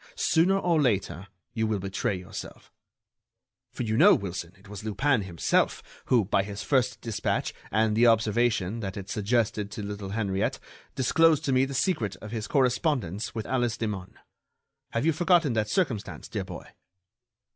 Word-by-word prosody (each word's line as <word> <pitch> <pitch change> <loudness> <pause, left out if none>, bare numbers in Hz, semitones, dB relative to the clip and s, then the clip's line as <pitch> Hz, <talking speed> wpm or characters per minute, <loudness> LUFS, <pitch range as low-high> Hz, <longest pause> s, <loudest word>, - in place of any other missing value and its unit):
Sooner 180 +4 +3
or 170 -5 +2
later 100 -6 0 0.3
you 110 -1 0
will 110 -1 0
betray 95 +1 -2
yourself.' 90 -1 -9 1.0
For - - -4
you 110 -1 -1
know, 200 +7 +7
Wilson, 90 - -5
it 95 - -19
was 105 0 -8
Lupin 110 +4 +1
himself, 90 -4 0 0.2
who, 120 -5 +3
by 95 - +2
his 100 +1 -6
first 130 -3 +1
dispatch 115 -3 -2 0.2
and 110 0 +2
the 120 +2 +5
observation 115 -2 +2
that 95 -3 -5
it 95 -1 -7
suggested 105 -1 0
to 105 +1 -6
little 100 -1 -5
Henriette, 100 -2 -1 0.4
disclosed 155 +4 +3
to 135 - +1
me 130 +1 +4
the 135 0 -6
secret 120 - 0
of 105 +4 -10
his 110 -2 -4
correspondence 125 - 0
with 110 -2 -3
Alice 120 -3 0
Hemun. 105 -5 -4 0.7
Have 115 +5 -1
you 165 - +3
forgotten 170 -4 +3
that 110 -2 0
circumstance, 130 - -2
dear 100 -4 -4
boy?" 90 -2 -8
110 Hz, 160 wpm, -27 LUFS, 100-130 Hz, 1.0 s, know